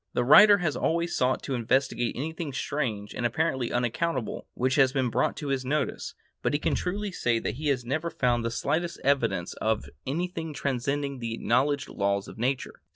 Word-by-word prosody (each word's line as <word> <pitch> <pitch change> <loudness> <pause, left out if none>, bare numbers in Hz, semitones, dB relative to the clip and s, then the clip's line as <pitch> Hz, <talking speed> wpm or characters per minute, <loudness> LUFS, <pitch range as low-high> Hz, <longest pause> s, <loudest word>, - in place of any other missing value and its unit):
The 120 - +1
writer 205 - +8
has 170 -6 -1
always 170 +1 0
sought 130 0 +1
to 135 - -3
investigate 125 0 0
anything 160 +1 -4
strange 120 -8 -3
and - - -4
apparently 130 0 0
unaccountable 125 +2 -1
which 130 +1 +1
has 135 -1 +4
been 130 -3 0
brought - - +1
to 145 - -4
his 135 -1 0
notice, 150 +4 -2 0.3
but - - 0
he 145 - +2
can - - 0
truly 200 +3 -2
say 120 -9 0
he 150 +4 -4
has 130 -4 +1
never 155 +7 -1
found 120 -6 +1
the 115 - 0
slightest 170 +8 -1
evidence 115 -10 +1
of 110 -1 0 0.2
anything 165 +1 -3
transcending 140 +1 -2
the 115 -1 -3
acknowledged 135 +5 +1
laws 100 0 -1
of - - -11
nature. 130 +3 -2
135 Hz, 180 wpm, -27 LUFS, 120-155 Hz, 0.3 s, writer